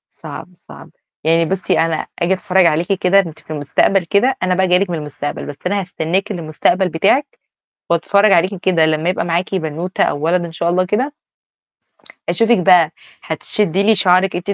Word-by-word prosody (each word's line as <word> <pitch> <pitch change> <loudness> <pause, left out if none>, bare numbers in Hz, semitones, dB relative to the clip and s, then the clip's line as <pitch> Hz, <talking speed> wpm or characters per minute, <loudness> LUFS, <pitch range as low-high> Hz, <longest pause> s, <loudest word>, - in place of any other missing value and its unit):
صعب، - - -10
صعب. - - -15 0.3
يعني 165 +1 +3
بُصّي 185 +1 -1
أنا 165 -1 0 0.2
آجي 175 +2 +1
أتفرّج 185 -1 +2
عليكِ 170 +4 +1
كده 190 +1 +2
أنتِ 165 -5 -1
في - - -15
المستقبل 155 +6 +1
كده، 200 +10 +1
أنا 185 0 +1
بقى 190 +1 +1
جاية 180 0 +4
لِك 195 -1 -2
من 170 - -2
المستقبل، 145 -1 -6
بس 145 - -8
أنا 200 +2 0
هستناكِ 180 +3 -2
للمستقبل 175 +2 0
بتاعِك 250 - 0 0.5
وأتفرّج 200 +5 +3
عليكِ 185 +3 +3
كده 180 -3 +1
لمّا 155 +1 0
يبقى 180 - -1
معاكِ 175 +3 -2
بنوتة 170 +1 -2
أو - - -1
ولد 175 +1 +1
إن 170 - -7
شاء 170 +1 -2
الله 180 +2 +1
كده 235 +10 -1 1.2
أشوفِك 230 +1 +2
بقى 175 -4 +4 0.3
هتشدّي 190 +4 0
لي 220 +1 +4
شعرك 185 0 +2
أنتِ 180 +3 -5
180 Hz, 180 wpm, -17 LUFS, 165-195 Hz, 1.2 s, جاية